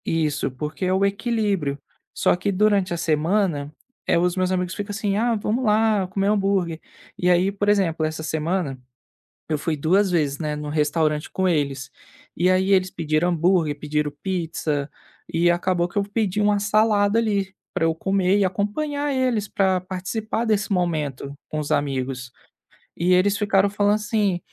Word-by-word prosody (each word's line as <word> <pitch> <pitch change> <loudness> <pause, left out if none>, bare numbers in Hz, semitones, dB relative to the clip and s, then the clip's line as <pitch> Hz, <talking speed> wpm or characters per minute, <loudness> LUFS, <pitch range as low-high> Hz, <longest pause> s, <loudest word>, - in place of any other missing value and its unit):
Isso, 155 -3 0
porque 150 +7 -5
é 185 - +1
o 190 +1 +2
equilíbrio, 200 - -1 0.3
só - - +2
que 200 +3 -1
durante 200 -1 +2
a 170 - -1
semana, 160 -1 0 0.4
eh, - - +3
os 175 +1 +1
meus 185 -1 0
amigos 180 -1 -1
ficam 205 +1 -5
assim, 205 -1 -1
ah, 230 +2 +1
vamos 220 +4 -1
lá 215 -3 +2
comer 195 +1 -1
hambúrguer. 195 -5 +1 0.4
E 180 - 0
aí, 180 +2 +3
por 205 +1 -1
exemplo, 185 -6 +2
essa 155 0 -2
semana, 160 -3 -2 0.7
eu 155 - +1
fui 155 +2 -2
2 185 +7 +2
vezes, 150 -5 0
né, 150 -2 -2
no 150 0 -5
restaurante 150 0 0
com 190 0 0
eles, 140 -6 -1 0.5
e 180 +2 +3
aí 185 +1 +2
eles 185 -1 +3
pediram 160 +1 0
hambúrguer, 170 -3 +1
pediram 150 0 -2
pizza, 160 -6 -2 0.4
e 170 +1 +3
acabou 175 0 +1
que 175 - -20
eu 205 - +3
pedi 205 -1 -1
uma 205 0 +3
salada 210 0 +2
ali 200 -4 0 0.2
para - - 0
eu 165 - +1
comer 190 +2 +1
e 200 - +3
acompanhar 285 +11 -1
eles 250 -5 0
para 190 -2 +1
participar 190 +5 -3
desse 210 -2 0
momento 155 -7 -1 0.2
com 155 - -4
os 150 -1 -4
amigos. 130 -3 -2 0.7
E 180 +2 +2
eles 190 +3 +3
ficaram 200 -1 +3
falando 205 0 +2
assim, 210 -3 0
185 Hz, 170 wpm, -23 LUFS, 155-205 Hz, 0.7 s, eh